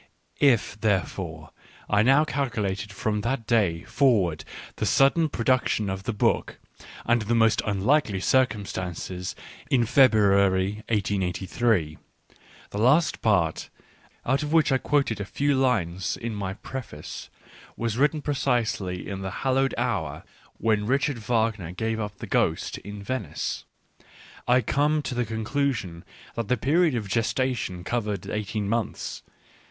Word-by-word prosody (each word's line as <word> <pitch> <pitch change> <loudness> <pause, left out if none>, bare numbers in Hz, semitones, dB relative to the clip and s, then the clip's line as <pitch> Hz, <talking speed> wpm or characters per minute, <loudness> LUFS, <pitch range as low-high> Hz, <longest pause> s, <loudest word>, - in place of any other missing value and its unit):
If, 120 -6 +2
therefore, 90 -6 -2 0.4
I 105 -1 +3
now 135 +7 +5
calculate 105 -9 -2
from 105 +1 -2
that 120 +1 -2
day 95 -7 +1
for 135 +6 +3
ward 85 -4 -2 0.3
the - - -1
sudden 155 +4 +4
production 115 -5 +1
of 95 0 -5
the - - 0
book, 105 - 0 0.5
under 120 -1 +2
the 115 +3 0
most 115 -1 +4
unlikely 105 +1 +2
circumstances, 95 -6 -1 0.3
in 120 -3 +3
February 100 -5 +4
1 110 - +3
883, 95 -2 0 0.4
— - - -24
the 100 - -4
last 140 +9 +3
part, 90 -8 +1 0.6
out 135 +4 +1
of 150 0 -3
which 160 -3 +4
I 130 - +3
quoted 125 -9 0
a - - -1
few 145 +8 0
lines 95 - 0
in 115 -1 -4
my 100 -2 -4
preface, 110 - -8 0.5
was 115 -2 -1
written 150 +3 +1
precisely 115 -10 -1
in 95 -1 -5
the 95 0 -4
hal 130 - +3
lowed 135 +1 +1
hour 80 - -2 0.3
when 105 -2 +1
Richard 140 0 +1
Wagner 110 -6 -1
gave 110 +4 -2
up 105 -2 -5
the - - -7
ghost - - 0
in 100 0 -9
Venice, 105 - -3 0.4
— - - -21
I 125 +1 +5
come 150 +3 +1
to 130 - -3
the 120 -1 0
conclusion 110 -6 -2 0.3
that 115 -3 -3
the 125 - +1
period 155 +4 +2
of 110 -4 -3
gestation 115 -3 -1
covered 105 -1 -2
eighteen 105 -1 -3
months. 115 +1 -2
110 Hz, 145 wpm, -26 LUFS, 95-130 Hz, 0.6 s, now